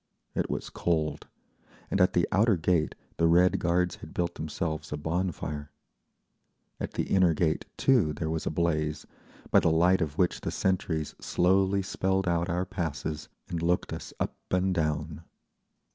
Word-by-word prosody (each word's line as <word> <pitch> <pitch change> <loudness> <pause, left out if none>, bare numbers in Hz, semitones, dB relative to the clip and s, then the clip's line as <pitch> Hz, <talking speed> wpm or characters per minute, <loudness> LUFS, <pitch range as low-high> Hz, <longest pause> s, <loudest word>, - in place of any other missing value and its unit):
It - - -1
was - - -4
cold, 75 -3 -1 0.6
and 95 - +2
at 90 0 +4
the 85 - +2
outer 105 0 +4
gate 85 -1 +1 0.2
the 85 - +4
Red 90 +2 +4
Guards 90 +1 +1
had 80 - -12
built 85 0 0
themselves 80 -1 -4
a 75 - -2
bon 85 +5 -1
fire. 75 -1 -6 1.1
At - - -4
the - - 0
inner 90 -4 +3
gate, 80 -1 0
too, 120 - +3
there 80 +1 -3
was 80 -1 -2
a - - +3
blaze, 75 -2 -1 0.5
by - - +7
the - - +2
light 90 +4 +4
of 75 -1 -2
which 90 -2 +1
the - - -2
sentries 85 -5 -1
slowly 95 +2 +2
spelled 95 0 0
out 85 0 +1
our 90 +2 0
passes 80 -3 -4 0.2
and 85 -2 -3
looked 85 +1 0
us - - -7
up - - -2
and 90 +1 +1
down. 75 -1 -1
85 Hz, 165 wpm, -28 LUFS, 80-90 Hz, 1.1 s, by